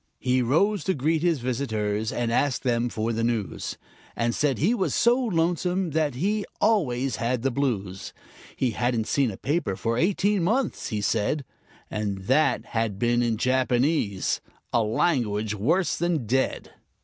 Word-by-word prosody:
He 125 0 +1
rose 180 - +2
to 190 - +1
greet 155 +3 +1
his 165 -6 +1
visitors, 110 -4 -1
and 120 -1 -1
ask 135 +2 +1
them 120 -1 +1
for 115 +1 -2
the 115 +1 -1
news, 115 -4 -2 0.4
And 115 0 0
said 145 0 +1
he 190 - +2
was 195 -6 0
so 240 +1 +4
lonesome 180 -5 0
that 150 -3 0
he 205 +9 0 0.2
always 135 - +1
had 120 0 -1
the 135 - +1
blues; 105 -8 -2 0.4
He 130 -3 0
hadn't 120 0 0
seen 135 0 +1
a 95 - -7
paper 145 - -1
for 115 +4 -1
eighteen 200 +2 +2
months, 230 +7 0
he 105 -4 -2
said, 115 +7 0 0.5
And 100 -3 -3
that 135 +7 +2
had 110 -3 -2
been 120 +2 +2
in 115 -2 0
Japanese 130 - +1 0.3
a 120 - +4
language 110 -3 0
worse 160 - +1
than 170 -7 0
dead. 130 +5 -1
125 Hz, 160 wpm, -25 LUFS, 115-165 Hz, 0.5 s, so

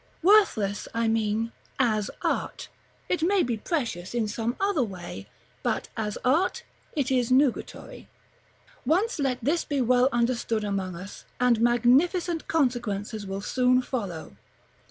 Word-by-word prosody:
Worthless, 335 - +3
I 230 0 +1
mean, 225 0 0 0.3
as 215 -6 +1
art; - - -2 0.4
it 360 - 0
may 375 +3 +3
be 240 -2 -1
precious 230 - -3
in 230 -3 +1
some 225 +3 -2
other 395 -6 +1
way, 180 - -7 0.3
but, - - -2
as 210 -2 -3
art, 315 +9 +2 0.3
it 280 -3 0
is 250 -2 +1
nugatory. 275 - 0 0.8
Once 365 - +1
let 270 -3 0
this 315 +7 +1
be 285 -2 -2
well 250 +1 +4
understood 235 -2 0
among 195 -3 -2
us, 185 +4 -9
and 245 -2 +3
magnificent 280 - +2
consequences 230 -8 -1
will 195 +1 -4
soon 255 +3 +2
follow. 200 -12 -5
240 Hz, 135 wpm, -26 LUFS, 215-285 Hz, 0.8 s, well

